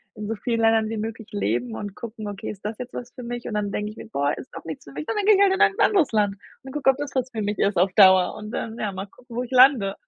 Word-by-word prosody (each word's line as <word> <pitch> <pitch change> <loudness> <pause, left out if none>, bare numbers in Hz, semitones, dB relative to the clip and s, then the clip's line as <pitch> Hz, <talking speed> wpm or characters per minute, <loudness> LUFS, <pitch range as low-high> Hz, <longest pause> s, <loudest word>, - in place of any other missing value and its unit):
in 210 -1 -6
so 225 - -1
vielen 230 +2 -1
Ländern 225 -1 +3
wie 225 - -3
möglich 220 0 -5
leben 120 - -1
und 205 - -6
gucken: 220 -2 -7
„Okay, 205 -1 -6
ist 200 -1 -9
das 215 +1 -3
jetzt 250 0 -7
was 245 0 -7
für 250 - -9
mich?“ 240 0 -5
Und 220 - -4
dann 205 -1 -1
denke 210 +1 -3
ich 215 - -15
mir: - - -9
„Boah, 145 -9 0
ist - - -10
doch - - -9
nichts 160 -3 -7
für 140 - -13
mich“ 150 +2 -6
und - - -2
dann 410 - 0
gehe 430 - +8
ich 390 - +3
halt 390 -1 +4
in 385 - -1
ein 410 -1 +5
anderes 375 -9 +3
Land 205 -3 +1 0.3
und 265 - -9
gucke 290 -2 +1
ob 265 - +3
das 290 -1 -4
was 260 -1 -1
für 225 -3 -4
mich 205 0 -2
ist 200 -2 +1
auf 185 +2 +3
Dauer 190 -3 +6
und 215 0 -8
dann, 225 -1 -4
ja, 210 - -2
mal 190 +1 -5
gucken 240 +3 -15
wo 245 - -1
ich 250 - -10
lande. 255 -6 +5
220 Hz, 320 wpm, -24 LUFS, 200-250 Hz, 0.3 s, gehe